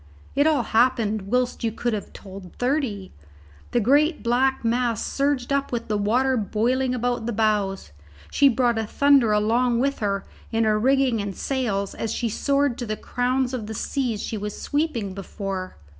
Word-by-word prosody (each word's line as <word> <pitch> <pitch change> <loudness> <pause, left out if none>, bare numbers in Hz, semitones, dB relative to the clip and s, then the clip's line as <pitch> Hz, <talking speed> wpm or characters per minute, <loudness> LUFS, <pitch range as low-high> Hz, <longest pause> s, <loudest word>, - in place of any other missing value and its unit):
It 285 +2 +3
all 295 -6 +2
happened 220 -4 +1
whilst 250 0 0
you 225 - +1
could 235 +2 -2
have 210 - -4
told 190 -2 -11
thirty. 245 -7 -1 0.6
The 240 - +1
great 290 - +3
black 255 +2 +1
mass 235 -1 0
surged 275 -2 0
up 280 0 0
with 235 -2 -3
the 210 - +1
water 250 +6 +2
boiling 250 +4 0
about 245 -1 -1
the - - 0
bows; 205 - 0 0.4
she 280 - +5
brought 240 -2 +1
a 220 - -2
thunder 275 -3 +4
along 230 +3 +2
with 275 +2 0
her 200 -2 -1 0.3
in 225 0 +1
her 215 -1 +2
rigging 260 -2 +2
and 200 -2 -5
sails 215 -8 -1
as 225 - -3
she 235 0 -1
soared 275 +2 0
to 240 - -4
the 215 0 -2
crowns 250 +2 -1
of 230 -5 -4
the 220 - -5
seas 245 -3 -2
she 220 - -4
was 210 0 -5
sweeping 285 -10 -1
before. 195 -1 -5
235 Hz, 175 wpm, -24 LUFS, 210-260 Hz, 0.6 s, she